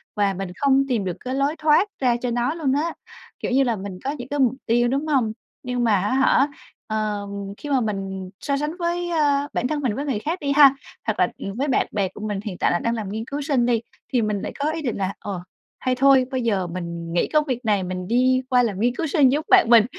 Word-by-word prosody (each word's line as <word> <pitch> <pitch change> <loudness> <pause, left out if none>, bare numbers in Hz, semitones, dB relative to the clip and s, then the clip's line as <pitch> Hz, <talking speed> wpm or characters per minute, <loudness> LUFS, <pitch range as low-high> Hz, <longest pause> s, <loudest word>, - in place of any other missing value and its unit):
và 200 -2 +2
mình 190 -1 -5
không 275 -1 +3
tìm 235 -6 0
được 180 - -3
cái 255 +1 -4
lối 280 +3 +1
thoát 310 +6 +4
ra 250 -3 +2
cho 250 -1 -1
nó 245 +4 0
luôn 300 -5 0
á. 315 +3 0 0.5
Kiểu - - -3
như 270 +2 +4
là 240 -3 +1
mình 190 -2 -7
có 275 - -1
những 245 -5 -7
cái 290 - -2
mục 255 -3 +4
tiêu, 240 +1 +3
đúng 275 +5 -1
hông? 255 -8 +1 0.3
Nhưng 250 -1 -1
mà 225 -3 +4
á 205 - -1
hả, 270 +1 +4 0.4
ờm, 210 -2 -2 0.3
khi 295 - -8
mà 270 -3 +2
mình 195 -3 -3
so 280 -1 -1
sánh 300 +4 -3
với 345 0 -1
ơ, 290 -4 +2
bản 250 - 0
thân 295 0 -2
mình 240 -6 0
với 285 +4 -3
người 260 -7 -1
khác 325 - -3
đi 280 -1 -1
ha, 280 -1 +7 0.3
hoặc - - -1
là, - - +4
ừ, 195 - -5
với 280 +3 0
bạn 265 - +2
bè 200 -2 0
của 205 - -12
mình 205 -2 -2
hiện 195 -5 -5
tại - - +2
là 175 - +1
đang 230 0 -1
làm 215 -4 -4
nghiên 220 +3 -4
cứu 285 +4 -4
sinh 275 -5 +1
đi, 235 -2 +2 0.3
thì 245 - +3
mình 210 -2 -1
lại - - -4
có 295 +2 +1
ý 320 0 -4
định 245 -7 -2
là 190 0 -1
"Ờ, 190 -4 -5 0.4
hay 255 -1 0
thôi 270 0 +5
bây 260 -1 -1
giờ 200 -6 0
mình 170 -1 -5
nghỉ 175 - +2
công 305 -1 +4
việc 250 -4 -3
này 205 -3 +2
mình 180 0 -4
đi 255 +3 +3
qua 250 -1 +4
làm 205 -5 -2
nghiên 240 +2 +1
cứu 325 - -2
sinh 280 -3 +4
giống 300 +2 0
bạn - - +6
mình." 230 -3 +7
250 Hz, 265 wpm, -23 LUFS, 210-280 Hz, 0.5 s, ha